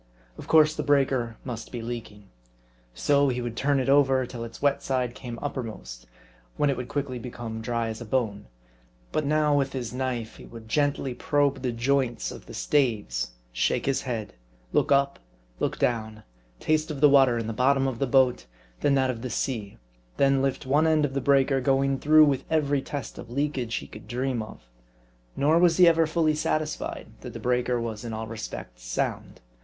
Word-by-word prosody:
Of - - -10
course 155 -1 +5
the 155 - -3
breaker 135 -5 +1
must 115 -3 -6
be 120 -2 -5
leaking. 115 -3 -7 0.7
So, 140 - +3
he 125 -1 -1
would 120 -1 -4
turn 140 0 +1
it 130 - -1
over, 135 -2 +4
till 120 -1 -7
its 115 - -9
wet 140 -1 +1
side 125 -2 -1
came 120 -2 -7
uppermost; 110 - -6 0.5
when 145 -1 +3
it 135 - -3
would 125 - -5
quickly 135 -3 -3
become 115 -2 -6
dry 115 0 -1
as 110 +1 -6
a - - -6
bone. 110 - -1 0.6
But 155 -2 -1
now, 150 0 +3
with 135 -1 0
his 125 -3 -4
knife, 125 -3 -3
he - - -12
would 115 -1 -11
gently 140 0 0
probe 145 +2 +1
the 125 -2 -1
joints 125 +1 0
of - - -11
the - - -9
staves; 110 - 0
r - - -22 0.2
shake - - 0
his 135 -1 +1
head; 115 -5 -4 0.4
look - - +2
up; 140 0 +3 0.4
look - - -1
down; 110 -2 -1 0.4
taste 155 0 +1
of 150 -3 -4
the 150 - +7
water 135 -4 +5
in 115 - -2
the 115 - -3
bottom 135 +3 +2
of 125 -3 -3
the 135 - +1
boat; 125 - +3 0.3
then 140 - +2
that 130 -1 +2
of 115 -2 -7
the 125 - -4
sea; 110 -6 -3 0.4
then 135 -1 +3
lift 135 -1 -1
one 145 +5 +3
end 155 -2 +3
of 135 - -4
the 140 - -1
breaker; 135 0 +3
going 135 +1 +2
through 155 +1 +6
with 140 -3 0
every 145 -3 +1
test 140 -4 -6
of - - -9
leakage 130 -3 -2
he - - -4
could 105 -1 -12
dream 125 +1 -1
of. 110 - -10 0.7
Nor 155 +4 +3
was 170 -2 +4
he 180 -1 +7
ever 165 -1 +4
fully 160 -1 +2
satisfied, 155 0 -2 0.2
that - - -8
the - - -7
breaker 125 0 0
was 115 -1 -4
in 115 -1 -5
all 110 +1 -4
respects 110 - -7
sound. - - -3
130 Hz, 195 wpm, -26 LUFS, 115-140 Hz, 0.7 s, the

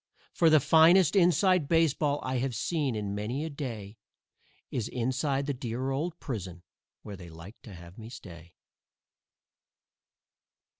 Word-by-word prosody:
For 165 - +4
the 155 -1 +6
finest 165 +6 +5
"inside" 180 -2 +3
baseball 155 -3 +2
I 130 -1 -2
have 130 -1 -2
seen 145 -6 -1
in 105 -2 -3
many 115 +9 -3
a 160 - -5
day 115 -8 -7 0.7
Is 115 -3 -2
inside 130 +3 -1
the 145 - -2
dear 125 +1 -4
old 160 +5 -3
prison, 90 -9 -6 0.4
where 105 - -8
they 90 -2 -11
like 85 +7 -13
to 105 - -12
have 85 +4 -13
me 110 0 -9
stay. 85 -8 -12
130 Hz, 140 wpm, -29 LUFS, 105-155 Hz, 0.7 s, the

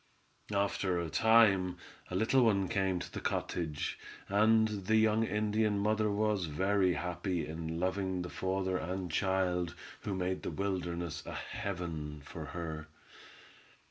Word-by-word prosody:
After 100 -2 +1
a 85 -2 -3
time 100 -5 +5 0.3
a 90 - -4
little 120 +6 +4
one 100 -4 +3
came 95 -4 +1
to - - -6
the - - -3
cottage, 80 -4 -2 0.3
and 110 +2 +4 0.2
the 110 - +4
young 110 0 +4
Indian 105 0 +1
mother 105 +1 +2
was 105 -2 +1
very 95 +4 +2
happy 90 0 -2
in 80 +1 -4
loving 95 0 -1
the 90 - -5
father 95 0 -1
and 90 0 -3
child 90 -1 +1 0.2
who 100 -3 -3
made 95 0 -1
the - - -3
wilderness 85 -4 -2
a - - -5
heaven 85 -9 -4
for - - -7
her. 80 -3 -5
95 Hz, 140 wpm, -33 LUFS, 90-105 Hz, 0.3 s, time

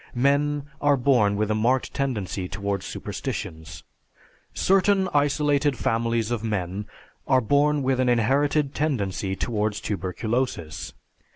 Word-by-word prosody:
Men 140 +3 +2 0.2
are 145 -1 +4
born 120 -6 +3
with 105 +1 0
a - - +3
marked 120 +4 +1
tendency 105 -9 -2
towards 100 0 -3
superstitions. 80 -1 -6 0.7
Certain 195 0 +3
isolated 145 -1 +2
families 115 0 0
of 115 -2 -2
men 105 -2 -3 0.4
are 130 -1 +5
born 145 +4 +2
with 130 0 +1
an 130 -1 +2
inherited 135 +5 +2
tendency 100 -10 -1
towards 105 -1 -1
tuberculosis. 100 -2 -3
120 Hz, 115 wpm, -25 LUFS, 105-140 Hz, 0.7 s, are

